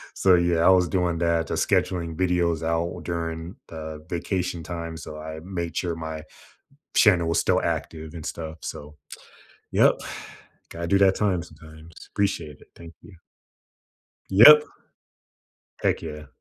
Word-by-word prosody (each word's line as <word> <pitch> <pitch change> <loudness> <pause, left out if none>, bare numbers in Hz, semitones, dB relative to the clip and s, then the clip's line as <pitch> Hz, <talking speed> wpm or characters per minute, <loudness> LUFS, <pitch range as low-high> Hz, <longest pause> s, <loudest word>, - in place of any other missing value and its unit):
So, 95 -2 +5
yeah, 85 -1 +2
I - - +7
was 90 -2 +5
doing 90 -3 0
that, 85 -1 +1
to - - -4
scheduling 85 -3 0
videos 85 -2 0
out 85 +1 -2
during 85 +1 -4
the 80 -1 -8
vacation 90 -1 -3
time. 85 -1 -6
So 75 -1 -9
I 80 0 -7
made 85 -2 -5
sure 85 -2 -1
my 80 -1 -6 0.7
channel 90 -6 +5
was 85 - +1
still - - +2
active 80 0 -4
and 80 -2 -8
stuff. 80 -1 -6
So, 75 +1 -8 0.8
yep, - - +4 0.7
gotta 85 0 -5
do 100 +2 +3
that 95 -1 +5
time 95 -5 0
sometimes. 80 0 -15
Appreciate 85 -7 -1
it. - - -18
Thank 85 0 -12
you. 100 - -15 1.1
Yep. 150 +10 +9 1.1
Heck - - 0
yeah. 75 0 -7
85 Hz, 145 wpm, -24 LUFS, 80-90 Hz, 1.1 s, Yep